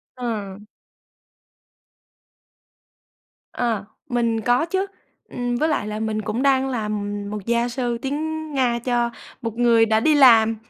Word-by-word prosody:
Ờ. 220 -6 -4 3.0
Ờ, 230 -5 -1 0.2
mình 235 -2 0
có 245 +7 +2
chứ, 380 +3 -1 0.4
ừm, 245 -1 -2
với 310 +5 +1
lại 290 -8 -1
là 215 +1 -4
mình 215 -1 -2
cũng 220 +5 -2
đang 270 -1 +3
làm 210 -4 -3 0.2
một 210 -1 -6
gia 235 +1 +1
sư 240 -1 -2
tiếng 315 +3 -3
Nga 245 -3 +1
cho 240 0 0 0.3
một 230 -1 -3
người 230 -2 +5
đã 220 0 +2
đi 310 +4 +3
làm. 225 -5 +6
235 Hz, 135 wpm, -22 LUFS, 220-260 Hz, 3.0 s, làm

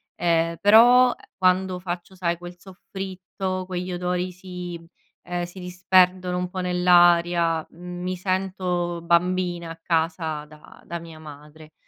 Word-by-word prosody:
ehm, 165 -1 +1
però, 240 +4 +7 0.2
quando 185 0 +1
faccio 175 +1 -6
sai 170 -2 -1
quel 175 0 -10
soffritto, 190 0 -6
quegli 180 0 -4
odori 180 +1 -2
si, 180 -1 -8 0.5
ehm 175 0 -3
si 175 +2 -8
disperdono 180 0 +2
un 180 0 -2
po' 185 +1 -6
nell'aria, 175 -2 +3
mi 180 +1 -5
sento 180 -2 -2
bambina 175 0 +1
a 165 0 -9
casa 160 -2 -1
da 150 0 -17
da 170 - -5
mia 165 -1 -12
madre, 150 +1 -13
180 Hz, 125 wpm, -24 LUFS, 170-185 Hz, 0.5 s, però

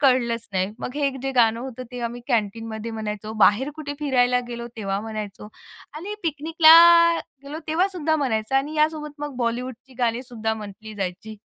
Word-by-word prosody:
कळलंच 235 -4 +2
नाही. 190 +2 0
मग 250 - -6
हे 280 -2 +1
जे 270 - -1
गाणं 230 -2 +3
होतं 255 -1 -7
ते 245 - -5
आम्ही 240 +1 -4
कॅन्टीनमध्ये 225 0 -2
म्हणायचो, 215 -1 -5
बाहेर 265 +8 +3
कुठे 290 -2 -5
फिरायला 250 -3 +2
गेलो 235 0 -5
तेव्हा 195 -2 -2
म्हणायचो 210 -1 -6 0.5
आणि 385 +7 -5
पिकनिकला 320 +1 +6 0.7
गेलो 295 +3 -6
तेव्हासुद्धा 325 -2 +1
म्हणायचं 235 -4 -1
आणि 290 +3 -1
यासोबत 305 -1 0
मग 295 -2 -5
बॉलिवूडची 250 +2 -4
गाणी 240 0 0
सुद्धा 225 -3 -3
म्हटली 215 0 -9
जायची. 200 +3 -5
245 Hz, 155 wpm, -23 LUFS, 220-285 Hz, 0.7 s, पिकनिकला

